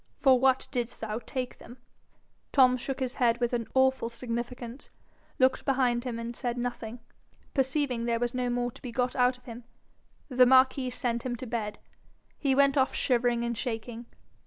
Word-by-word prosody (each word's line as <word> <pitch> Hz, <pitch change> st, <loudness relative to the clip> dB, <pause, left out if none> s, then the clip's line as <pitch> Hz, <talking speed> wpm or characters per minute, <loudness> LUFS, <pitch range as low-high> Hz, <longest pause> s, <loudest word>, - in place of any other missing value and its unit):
'For 260 Hz, -3 st, +5 dB
what 265 Hz, 0 st, +3 dB
didst 245 Hz, -2 st, -3 dB
thou 220 Hz, 0 st, -3 dB
take 255 Hz, 0 st, -5 dB
them?' 240 Hz, +2 st, -12 dB, 0.7 s
Tom 255 Hz, -2 st, +5 dB
shook 260 Hz, +2 st, -4 dB
his 260 Hz, -1 st, -1 dB
head 235 Hz, -1 st, +3 dB
with 240 Hz, 0 st, 0 dB
an 235 Hz, -2 st, -1 dB
awful 260 Hz, -2 st, +3 dB
significance, 240 Hz, +2 st, -6 dB, 0.5 s
looked 260 Hz, 0 st, +3 dB
behind 255 Hz, -3 st, +1 dB
him, 240 Hz, -2 st, -3 dB
and 230 Hz, +1 st, -5 dB
said 245 Hz, -1 st, -3 dB
nothing. 240 Hz, -1 st, -4 dB, 0.5 s
Perceiving 265 Hz, -3 st, 0 dB
there 235 Hz, -1 st, +1 dB
was 240 Hz, 0 st, -1 dB
no 250 Hz, -1 st, -1 dB
more 245 Hz, 0 st, -1 dB
to -, -, -16 dB
be 250 Hz, -, -6 dB
got 250 Hz, +1 st, -1 dB
out 250 Hz, 0 st, +3 dB
of 250 Hz, -, -27 dB
him, 240 Hz, 0 st, -9 dB, 0.6 s
the 255 Hz, -2 st, +5 dB
marquis 260 Hz, 0 st, +4 dB
sent 240 Hz, -1 st, -2 dB
him 250 Hz, -1 st, -2 dB
to 250 Hz, -, -7 dB
bed. 220 Hz, -3 st, -3 dB, 0.6 s
He 275 Hz, -3 st, +2 dB
went 280 Hz, 0 st, +4 dB
off 265 Hz, -, +1 dB
shivering 240 Hz, -2 st, +1 dB
and 235 Hz, 0 st, -2 dB
shaking. 235 Hz, 0 st, -5 dB
245 Hz, 180 wpm, -28 LUFS, 235-260 Hz, 0.7 s, For